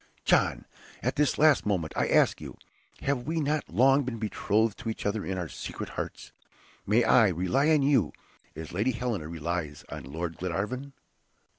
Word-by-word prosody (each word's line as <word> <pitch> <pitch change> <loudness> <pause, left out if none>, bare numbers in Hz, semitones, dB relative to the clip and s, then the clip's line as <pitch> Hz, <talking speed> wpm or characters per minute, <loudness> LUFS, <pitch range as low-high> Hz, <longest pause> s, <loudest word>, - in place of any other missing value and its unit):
John! - - +2 0.4
at - - 0
this 145 -3 +2
last 155 -2 +5
moment 90 -7 -1
I - - +1
ask - - +3
you, - - -8 0.4
have 140 -2 0
we 165 +1 0
not 150 0 -1
long 135 +9 +4
been 125 -2 -4
betrothed 110 0 0
to 115 - -4
each 110 - -5
other 100 +1 -1
in 95 0 -3
our 90 -2 -3
secret - - -6
hearts? - - -6 0.6
May 110 +4 +4
I 115 -2 +6
rely 95 - +1
on 155 -3 +4
you, 130 - +3 0.4
as 80 0 -8
Lady 110 +8 +1
Helena 115 -9 -3
relies 80 -2 -4
on - - -6
Lord 80 +4 -5
Glenarvan?" 105 +10 -3
110 Hz, 170 wpm, -28 LUFS, 90-135 Hz, 0.6 s, I